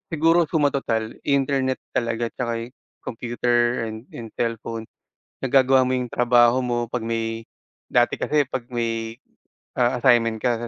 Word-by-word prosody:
Siguro 165 +2 +4
suma 155 -2 +1
total 115 -4 -2
internet 135 -2 +1 0.2
talaga 115 -1 0
at - - -14
saka 115 -2 -3 0.3
computer 120 0 0
and 110 0 -7
and 115 - -8
cellphone. 115 -1 -3 0.6
Nagagawa 130 0 +4
mo 130 - +1
yung 125 -1 -3
trabaho 120 0 +4
mo 120 -2 -1
pag 125 - -1
may, 115 0 -3 0.4
dati 120 -1 +2
kasi 150 -1 +2
pag 130 -2 -5
may, 115 -2 -3 0.6
ah, 120 0 +3
assignment 115 -3 +3
ka 120 -2 0
120 Hz, 140 wpm, -23 LUFS, 115-130 Hz, 0.6 s, Siguro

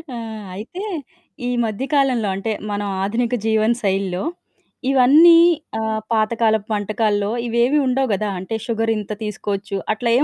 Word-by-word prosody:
ఆహ్, 220 -3 -7
అయితే 230 - -7 0.7
ఈ - - 0 0.2
మధ్యకాలంలో 255 -1 0
అంటే 205 +3 -3 0.2
మనం 205 0 -2 0.2
ఆధునిక 230 +4 0
జీవన 220 +1 +3
శైలిలో 195 -2 -1 0.7
ఇవన్నీ 295 +6 +7 0.4
ఆహ్, 220 0 -1
పాతకాలపు 220 -1 +1
వంటకాల్లో 205 0 0 0.2
ఇవేవీ 240 +5 +2
ఉండవు 265 +1 +1
గదా! 205 +1 -1
అంటే 190 +5 -4
షుగర్ 225 -1 0
ఇంత 210 +1 -6
తీసుకోవచ్చు 205 -1 -4 0.2
అట్లా 235 +2 -2
ఏం 285 - +4
220 Hz, 130 wpm, -20 LUFS, 205-245 Hz, 0.7 s, ఇవన్నీ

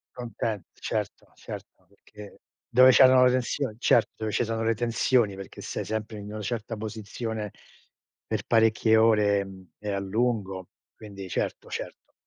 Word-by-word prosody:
Conten 115 -4 -3
certo, - - -4
certo, 95 - -10
perché 100 +1 -14 0.3
dove 130 +2 +7
c'erano 130 -1 +7
le 125 - +6
tensioni 130 -1 -1
certo, 120 -2 +3
dove 110 -1 -3
ci 120 - +1
sono 115 0 -2
le 115 0 +2
tensioni, 115 -1 +1
perché 95 - -9
sei - - -4
sempre 110 0 -4
in 105 0 -8
una 110 - -5
certa 115 +1 -4
posizione 110 0 -5 0.8
per - - -2
parecchie 110 0 +4
ore 105 -2 +4
e - - -3
mhmm, 95 -1 -12
e 105 - -5
a 100 - -1
lungo, 100 -2 -1 0.3
quindi 100 -3 -9
certo, - - -3
certo. - - -7
110 Hz, 155 wpm, -27 LUFS, 100-115 Hz, 0.8 s, dove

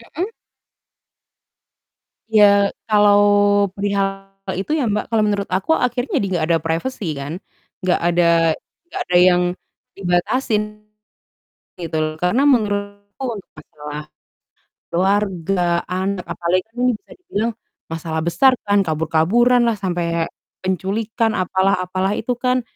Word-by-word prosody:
Mhm. 355 +5 -1 2.0
Ya, 200 -2 +4 0.2
kalau 205 -1 +5 0.5
perihal 195 0 -2 0.3
itu 195 - -4
ya 300 - 0
Mbak, 210 - -1
kalau 225 -2 +1
menurut 205 -1 0
aku, 190 +11 -1
akhirnya 250 +1 0
jadi - - -1
enggak 175 -4 0
ada 165 - +4
privacy 165 - -3
kan, 140 +5 -5 0.4
enggak 185 -1 +1
ada 175 0 +3 0.6
enggak 345 - -8
ada 180 - 0
yang 180 -1 +4 0.5
dibatasin, 195 +5 0 1.2
gitu 165 -2 -4
loh. 155 0 0
Karena 225 +10 +2
menurutku 205 -3 0 0.2
untuk - - -27
masalah 150 -1 -8 0.9
keluarga, 190 -1 +1 0.3
anak, 185 0 -2
apalagi 175 +2 0
kan 225 - -37
ini 250 - +4
bisa 215 - -11
dibilang, 235 - -1 0.4
masalah 160 0 -3
besar 260 - +4
kan, 205 0 +2
kabur-kaburan 165 +10 +2
lah, 230 - +2
sampai 175 -3 -2 0.6
penculikan, 210 +5 -1
apalah 190 +1 +1
apalah 185 +2 -1
itu 240 +4 -2
kan. 250 +1 +1
195 Hz, 120 wpm, -20 LUFS, 175-215 Hz, 2.0 s, kalau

